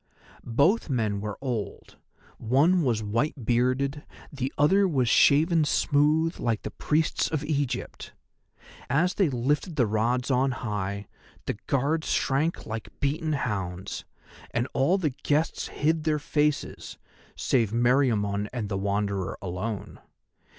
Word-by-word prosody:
Both 145 - +2
men 110 -6 0
were 105 -1 -4
old, 120 -6 -5 0.4
one 145 +10 +3
was 120 -7 0
white 115 +5 -1
bearded, 130 +5 +1 0.3
the 135 -1 -3
other 190 +7 +4
was 135 -8 +1
shaven 155 +7 +5
smooth 150 +3 +2
like 115 -3 -1
the - - -5
priests 155 +1 0
of 155 -2 -2
Egypt. 145 -3 -3 0.8
As 165 +8 +2
they 190 -6 +2
lifted 145 +7 -1
the 125 -5 +3
rods 120 +5 0
on 130 +1 +2
high 100 -3 -3 0.4
the 105 - -3
Guards 145 +4 0
shrank 150 +5 0
like 110 0 -5
beaten 155 +3 0
hounds, 95 -8 -3 0.5
and 120 +2 -1
all 145 +9 +3
the 160 -7 0
guests 150 +4 -1
hid 160 +1 0
their 155 -1 +1
faces, 150 0 -1 0.4
save 115 -5 +1
Meriamun 115 -4 +2
and 115 -5 -4
the 100 -2 -2
Wanderer 100 -2 -1
alone. 100 +3 -5
130 Hz, 130 wpm, -27 LUFS, 110-150 Hz, 0.8 s, shaven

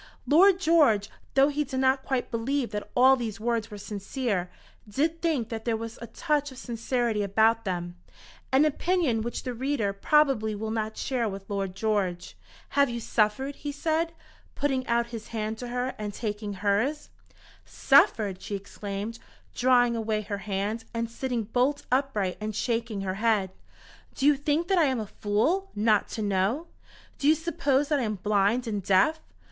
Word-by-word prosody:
Lord 370 +5 +6
George, 295 - +3 0.2
though 275 +1 +6
he 295 +1 0
did 260 -2 -4
not 265 0 +2
quite 265 -3 -2
believe 245 +3 -1
that 210 0 -5
all 260 +2 +7
these 230 -4 -4
words 230 -1 -1
were 210 - -8
sincere, 205 -1 -3 0.4
did 320 +9 0
think 300 -10 0
that 225 -1 -5
there 230 -2 0
was 230 0 -7
a 235 - -6
touch 295 -1 -1
of 260 - -12
sincerity 235 -2 -1
about 220 +3 +2
them 175 -2 -3 0.5
an 270 +3 +5
opinion 310 -6 +1
which 235 +2 -4
the 250 - -3
reader 245 -5 -1
probably 225 -2 +2
will 220 +1 -4
not 220 -1 -3
share 245 -4 -1
with 195 0 -8
Lord 195 -2 -3
George. 195 -5 -1 0.3
"Have 280 -1 +3
you 235 0 -3
suffered?" 230 +5 0
he 290 - -4
said, 320 +3 0 0.4
putting 265 -3 -1
out 235 0 +2
his 220 -2 -6
hand 220 -1 -4
to 245 - -5
her 250 +1 -2
and 210 -1 -3
taking 210 -2 -4
hers. 210 +10 0 0.5
"Suffered!" 210 -8 +3
she 205 - -4
exclaimed, 200 +2 -6 0.3
drawing 245 -1 +3
away 220 -1 -1
her 200 -1 -4
hand, 205 +3 -3
and 230 0 -2
sitting 245 -1 -2
bolt 255 +6 0
upright 250 -9 0
and 215 -1 -3
shaking 230 -3 -1
her 190 -1 -2
head. 215 -5 +2 0.6
"Do 270 - -1
you 295 0 +6
think 295 +4 0
that 380 -2 +4
I 325 - +5
am 260 -3 0
a 215 - -3
fool, 230 - 0
not 210 0 +2
to 220 - -2
know! 200 - 0 0.5
Do 285 - +1
you 310 - +6
suppose 295 -3 0
that 295 -2 +2
I - - 0
am 215 -1 -2
blind 205 +5 +1
and 210 -3 -2
deaf? 195 - +3
230 Hz, 175 wpm, -27 LUFS, 210-275 Hz, 0.6 s, all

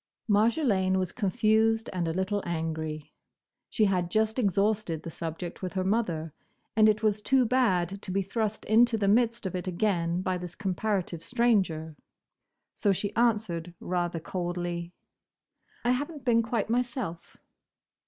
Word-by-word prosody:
Marjolaine 205 -3 +2
was 185 -2 -1
confused, 225 +1 +2
and 175 -2 -1
a - - 0
little 190 +3 -1
angry. 160 -2 -4 0.6
She 215 - +2
had 180 -3 +1
just 220 +5 +1
exhausted 200 -5 +1
the 165 - -6
subject 165 +2 -6
with 185 -1 -4
her 185 - 0
mother, 180 -7 -1 0.4
and 215 0 +6
it 215 +1 +1
was 210 -1 +2
too 260 +3 +3
bad 195 -7 +1
to - - -8
be 195 +1 0
thrust 215 +2 -2
into 230 +1 +4
the 200 -2 0
midst 235 +2 +2
of 190 - -2
it 180 +1 -4
again 175 -2 0
by 185 -1 -1
this 180 0 -7
comparative 190 -3 -2
stranger. 190 -10 +1 0.8
So 205 - +1
she 200 +2 -2
answered 205 -8 0
rather 175 -2 -2
coldly, 175 0 -3 0.9
"I 245 - +4
have 275 +5 0
n't 295 -4 -11
been 230 -2 +4
quite 230 -2 -1
myself." 235 -7 -3
195 Hz, 150 wpm, -28 LUFS, 175-225 Hz, 0.9 s, and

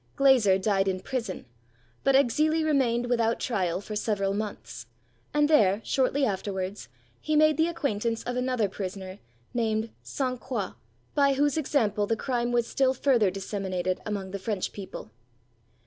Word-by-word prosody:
Glaser 250 -9 +5
died 195 0 +1
in 185 -1 0
prison, 230 -4 -4 0.6
but 275 -1 +4
Exili 305 +5 +3
remained 250 -6 +2
without 235 -2 +1
trial 185 -7 -1
for 210 +2 -7
several 205 -2 0
months; 205 - -5 0.4
and 295 0 +3
there, 210 -10 +4
shortly 270 +1 +1
afterwards, 195 -1 -3 0.3
he 310 - -1
made 310 0 +5
the 320 +2 +2
acquaintance 230 -9 -2
of 245 - -3
another 250 -4 +1
prisoner, 190 0 -6 0.3
named 220 -1 0
Sainte 255 -2 -3
Croix, 215 -8 -3 0.4
by 280 -1 +4
whose 285 0 +2
example 220 -9 +1
the 225 - +1
crime 240 0 -1
was 240 -1 +2
still 265 +2 +1
further 240 -6 +3
disseminated 185 -1 -3
among 200 -3 -4
the 200 - -4
French 195 -1 -3
people. 190 - -8
225 Hz, 145 wpm, -27 LUFS, 195-265 Hz, 0.6 s, Glaser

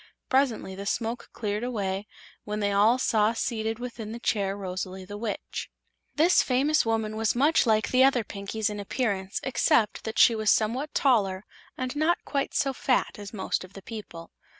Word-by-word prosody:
Presently 260 -7 +1
the 200 +1 -6
smoke 230 +2 -2
cleared 210 0 -3
away, 205 -4 -2 0.4
when 210 0 -4
they 205 -1 +1
all 210 +5 +4
saw 220 -3 +2
seated 225 -1 -2
within 235 -3 -6
the 235 - -6
chair 200 -4 0
Rosalie 185 -1 -5
the 205 +2 -8
Witch. 210 0 -5 0.5
This 330 +4 +5
famous 280 +4 +2
woman 220 -1 0
was 220 +1 0
much 285 +1 +3
like 220 -1 +2
the 255 +1 +5
other 265 -3 +4
Pinkies 210 +2 -3
in 210 - -5
appearance 200 -3 -2
except 230 -4 +2
that 220 0 -4
she 235 - +7
was 215 -1 0
somewhat 250 +7 +1
taller 205 -8 +2 0.3
and 255 +2 -3
not 315 +4 +2
quite 280 -2 -2
so 275 -2 +1
fat 255 -4 0
as 205 -1 -8
most 195 -3 -2
of 185 0 -13
the 195 - -11
people. 190 -7 -9
220 Hz, 175 wpm, -27 LUFS, 205-250 Hz, 0.5 s, she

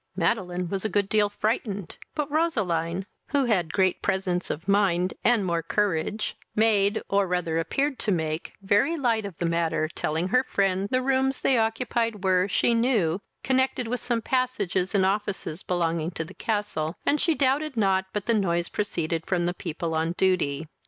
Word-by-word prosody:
Madeline 180 -1 0
was 190 +2 -3
a 215 - 0
good 205 -2 +1
deal 210 0 +2
frightened, 205 -3 -2 0.2
but 300 -1 -2
Roseline, 190 - 0 0.2
who 280 -2 +1
had 180 -9 +1
great 185 -1 +1
presence 185 -2 -1
of 165 +6 -4
mind, 190 -3 +2
and 235 -5 +3
more 170 -2 0
courage, 205 +3 -1 0.2
made, 210 -1 +3
or 200 -1 +2
rather 175 -2 0
appeared 275 - -1
to 210 - 0
make, 160 -2 -2
very 210 +12 +2
light 230 -7 +1
of 185 - -11
the 175 - -2
matter, 165 -1 +1
telling 160 +2 -2
her 255 +5 +3
friend 195 -4 0
the 255 +2 +1
rooms 265 0 +1
they 265 - +3
occupied 225 -1 -1
were, 185 0 +3
she 235 +4 +2
knew, 220 -7 +2 0.2
connected 260 -2 +1
with 250 +2 -2
some 235 -2 -1
passages 210 -8 0
and 190 -1 +4
offices 195 -4 -2
belonging 170 -2 -1
to 165 -2 -4
the 190 - -12
castle, 205 -8 -2
and 295 - +2
she 330 - +2
doubted 275 0 +1
not 190 -3 +2
but 210 -2 -3
the 230 - +2
noise 175 -5 +1
proceeded 165 -5 -2
from 175 -2 +1
the 175 - 0
people 170 -2 -4
on 160 +1 0
duty. 175 -6 +1
195 Hz, 175 wpm, -26 LUFS, 175-230 Hz, 0.2 s, and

